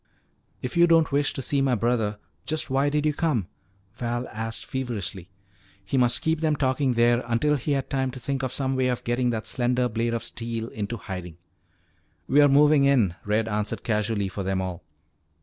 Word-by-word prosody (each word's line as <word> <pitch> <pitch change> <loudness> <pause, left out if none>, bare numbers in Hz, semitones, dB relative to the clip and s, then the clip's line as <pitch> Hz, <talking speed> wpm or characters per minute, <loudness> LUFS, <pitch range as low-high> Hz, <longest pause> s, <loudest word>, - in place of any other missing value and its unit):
"If 125 - -4
you 170 0 +6
don't 165 -2 +4
wish 145 0 +2
to 135 - -5
see 140 +3 +1
my 135 -2 +2
brother, 115 -2 0 0.3
just 155 -2 -1
why 135 +2 +2
did 150 +1 0
you 150 - +2
come?" 145 - 0 0.5
Val 120 +1 -3
asked 115 +1 -5
feverishly. 105 -8 -4 0.6
He 115 - -3
must 125 -2 +2
keep 160 0 +1
them 155 -2 +2
talking 130 -1 +1
there 120 +1 +3
until 135 +6 +2
he 145 +2 -1
had 135 -1 -1
time 130 -1 0
to 130 0 -8
think 140 +1 -2
of 130 -2 -2
some 135 0 -1
way 130 -1 +2
of 125 -1 -1
getting 120 +1 0
that 110 -2 -2
slender 125 0 +1
blade 115 +1 -1
of 115 - -3
steel 115 -1 -4
into 105 +2 -4
hiding. 90 -5 -7 0.9
"We're 145 +1 +6
movin' 145 +1 +5
in," 125 -10 +3
Red 105 +2 +1
answered 105 -1 -2
casually 105 -2 0
for 95 +1 -5
them 95 0 -1
all. 90 -1 -4
125 Hz, 190 wpm, -25 LUFS, 110-140 Hz, 0.9 s, you